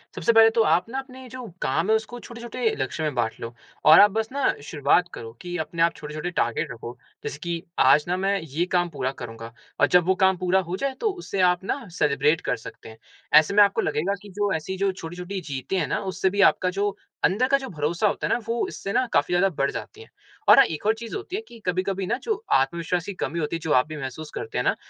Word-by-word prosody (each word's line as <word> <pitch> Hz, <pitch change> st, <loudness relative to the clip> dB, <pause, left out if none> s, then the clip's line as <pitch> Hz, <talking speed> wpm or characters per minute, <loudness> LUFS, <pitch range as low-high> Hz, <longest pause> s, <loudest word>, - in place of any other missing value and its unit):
सबसे 235 Hz, -, +2 dB
पहले 225 Hz, 0 st, +8 dB
तो 225 Hz, 0 st, +2 dB
आप 180 Hz, -, +3 dB
ना 265 Hz, +3 st, -3 dB
अपने 260 Hz, -1 st, -10 dB
जो 255 Hz, +1 st, -8 dB, 0.2 s
काम 165 Hz, +9 st, 0 dB
हैं, 220 Hz, -, +5 dB
उसको 225 Hz, +2 st, -4 dB
छोटे-छोटे 235 Hz, 0 st, -3 dB
लक्ष्यों 135 Hz, +4 st, -2 dB
में 150 Hz, -, -3 dB
बाँट 115 Hz, -2 st, -1 dB
लो 115 Hz, 0 st, -6 dB, 0.3 s
और 155 Hz, +1 st, +9 dB
आप 205 Hz, 0 st, +7 dB
बस 220 Hz, +2 st, -2 dB
ना 280 Hz, +1 st, +1 dB
शुरुआत 150 Hz, +4 st, +2 dB
करो 115 Hz, 0 st, -8 dB
कि 175 Hz, 0 st, -6 dB
अपने 165 Hz, +1 st, -3 dB
आप 170 Hz, -, +2 dB
छोटे-छोटे 155 Hz, +3 st, -5 dB
टारगेट 120 Hz, -8 st, -1 dB
रखो। 120 Hz, +1 st, -8 dB, 0.3 s
जैसे -, -, -5 dB
कि, 170 Hz, -1 st, -3 dB, 0.2 s
"आज 150 Hz, -, +5 dB
ना, 180 Hz, +1 st, 0 dB
मैं 195 Hz, +1 st, 0 dB
ये 160 Hz, +2 st, -2 dB
काम 175 Hz, -1 st, 0 dB
पूरा 135 Hz, -4 st, -2 dB
करूँगा।" 115 Hz, -3 st, -9 dB, 0.3 s
और -, -, +5 dB
जब 180 Hz, -1 st, +4 dB
वो 190 Hz, +1 st, +3 dB
काम 190 Hz, -1 st, +4 dB
पूरा 185 Hz, +1 st, +2 dB
हो 185 Hz, -, -2 dB
जाए, 275 Hz, +3 st, -2 dB
तो 430 Hz, -, -1 dB
उसे 355 Hz, -, -6 dB
आप 180 Hz, +1 st, -4 dB
ना 235 Hz, +3 st, -3 dB
सेलिब्रेट 150 Hz, +2 st, +2 dB
कर -, -, -1 dB
सकते 115 Hz, -, -11 dB
हैं। 110 Hz, -, -13 dB, 0.4 s
ऐसे 155 Hz, +5 st, -1 dB
में 205 Hz, 0 st, +8 dB
आपको 200 Hz, -1 st, +2 dB
लगेगा 155 Hz, +6 st, 0 dB
कि 205 Hz, -, -12 dB
जो 205 Hz, -1 st, +1 dB
ऐसी 175 Hz, +4 st, -3 dB
जो 195 Hz, 0 st, +1 dB
छोटी-छोटी 180 Hz, +2 st, -6 dB
जीतें 135 Hz, +8 st, -3 dB
हैं 160 Hz, -, -1 dB
ना, -, -, -1 dB
उससे 190 Hz, 0 st, -1 dB
भी 200 Hz, +2 st, 0 dB
आपका 185 Hz, -, -2 dB
जो 200 Hz, +2 st, -1 dB, 0.3 s
अंदर 220 Hz, +7 st, +3 dB
का 275 Hz, +1 st, +4 dB
जो 270 Hz, -1 st, -7 dB
भरोसा 170 Hz, +4 st, 0 dB
होता 205 Hz, -, -1 dB
है -, -, +1 dB
ना, -, -, +2 dB
वो 230 Hz, 0 st, -1 dB
इससे 195 Hz, -, -6 dB
ना 255 Hz, -, +2 dB
काफ़ी -, -, +2 dB
ज़्यादा 180 Hz, +2 st, +4 dB
बढ़ 140 Hz, 0 st, 0 dB
जाती 430 Hz, -, -8 dB
है 450 Hz, -, -13 dB, 0.4 s
और -, -, +9 dB
हाँ, 270 Hz, -, +8 dB
एक 160 Hz, -3 st, -6 dB
और 215 Hz, -, +4 dB
चीज़ 225 Hz, 0 st, -7 dB
होती 385 Hz, -2 st, -5 dB
है 420 Hz, -, -2 dB
कि 235 Hz, -, -13 dB
कभी-कभी 185 Hz, +1 st, -1 dB
ना, 235 Hz, -, 0 dB
जो 435 Hz, -, -2 dB, 0.2 s
आत्मविश्वास 170 Hz, +5 st, +1 dB
की 200 Hz, -, -5 dB
कमी 170 Hz, -2 st, -3 dB
होती 155 Hz, +1 st, -2 dB
है, -, -, -3 dB
जो 160 Hz, -1 st, -4 dB
आप 130 Hz, +1 st, +4 dB
भी 155 Hz, -, -7 dB
महसूस 145 Hz, +3 st, -6 dB
करते 450 Hz, +1 st, -5 dB
हैं -, -, +1 dB
ना, -, -, +2 dB
180 Hz, 255 wpm, -24 LUFS, 155-220 Hz, 0.4 s, और